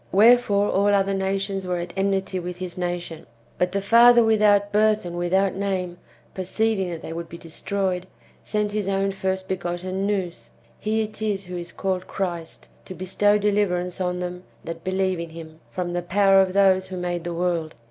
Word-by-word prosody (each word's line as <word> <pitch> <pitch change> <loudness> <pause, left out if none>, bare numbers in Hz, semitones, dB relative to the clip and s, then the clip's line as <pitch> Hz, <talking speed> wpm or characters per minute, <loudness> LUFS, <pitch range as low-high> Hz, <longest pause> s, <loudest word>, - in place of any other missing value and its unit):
Wherefore 210 -1 +5
all 200 +1 +2
other 195 0 +2
nations 195 0 -1
%vere 180 -1 -2
at 175 0 -6
enmity 195 -1 0
w^ith 180 0 -5
his 180 -1 -6
nation. 175 -4 -4 0.3
But 180 0 +1
the 200 0 -2
father 235 +3 +7
without 210 -2 +4
birth 215 -1 +3
and 175 0 -5
without 185 +3 +1
name, 185 -3 -2 0.3
perceiving 195 +1 0
that 170 -2 -6
they 160 - -6
would 170 0 -6
be 170 - -8
destroyed, 185 +2 -3 0.4
sent 210 -1 -1
his 210 -2 -2
own 195 0 +1
first 190 -1 -2
begotten 185 +1 -2
Nous 180 - -3 0.3
(he 220 +1 0
it 215 0 -8
is 205 -3 -1
who 180 0 -7
is 170 -1 -6
called 185 -1 -2
Christ) 175 -4 -5 0.2
to 185 - -8
bestow 205 +3 +2
deliverance 195 -4 0
on 180 0 -1
them 180 0 -5 0.2
that 165 0 -7
believe 185 -1 0
in 170 0 -5
him, 160 -1 -11
from 175 -1 -3
the 175 - -1
powder 195 +2 +4
of 185 -1 0
those 190 -1 +4
who 185 -1 -6
made 175 -1 -3
the 170 0 -4
world. 170 -3 -1
190 Hz, 185 wpm, -24 LUFS, 175-200 Hz, 0.4 s, father